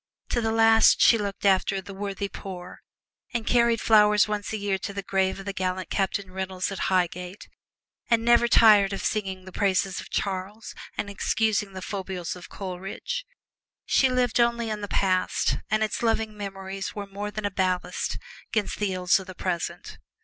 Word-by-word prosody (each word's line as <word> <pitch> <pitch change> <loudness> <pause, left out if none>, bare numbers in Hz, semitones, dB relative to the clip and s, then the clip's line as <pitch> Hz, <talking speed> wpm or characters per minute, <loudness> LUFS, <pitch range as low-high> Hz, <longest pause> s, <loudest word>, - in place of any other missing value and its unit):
To 240 - 0
the 225 -1 0
last, 225 0 +5
she 230 - +6
looked 200 -1 -4
after 195 0 +3
"the 195 +1 -9
worthy 200 0 -4
poor," 185 -2 -9 0.5
and 230 -2 -1
carried 235 -1 +3
flowers 210 -1 +5
once 210 -1 -3
a 220 - -2
year 200 -2 -1
to 200 +1 -5
the 200 0 -4
grave 190 -1 0
of 195 - -9
the 200 - -3
gallant 185 -1 -3
Captain 195 -1 -1
Reynolds 190 0 -3
at 195 - -2
Highgate, 180 +1 -1 0.6
and 230 -1 +3
never 235 0 +5
tired 210 -4 +6
of 195 - -4
sounding 190 -3 -2
the 185 - -10
praises 190 -1 0
of - - -12
Charles 200 +3 -3 0.2
and - - -2
excusing 205 0 0
the 185 -1 -7
foibles 190 -3 -4
of 180 - -11
Coleridge. 195 - -5 0.6
She 265 - +3
lived 250 -2 +1
only 235 -1 +2
in 210 -1 -4
the 205 - -4
past, 185 -2 +1
and 215 +1 +2
its 215 - -2
loving 225 -2 0
memories 195 -1 -6
were 205 -1 -4
more 200 +1 -5
than 210 0 -5
a 205 - -1
ballast 185 -1 -1 0.3
'gainst 215 -2 -1
the 200 -3 0
ills 180 +1 +3
of 190 - -10
the 185 - -9
present. 175 -3 -4
200 Hz, 180 wpm, -26 LUFS, 190-215 Hz, 0.6 s, she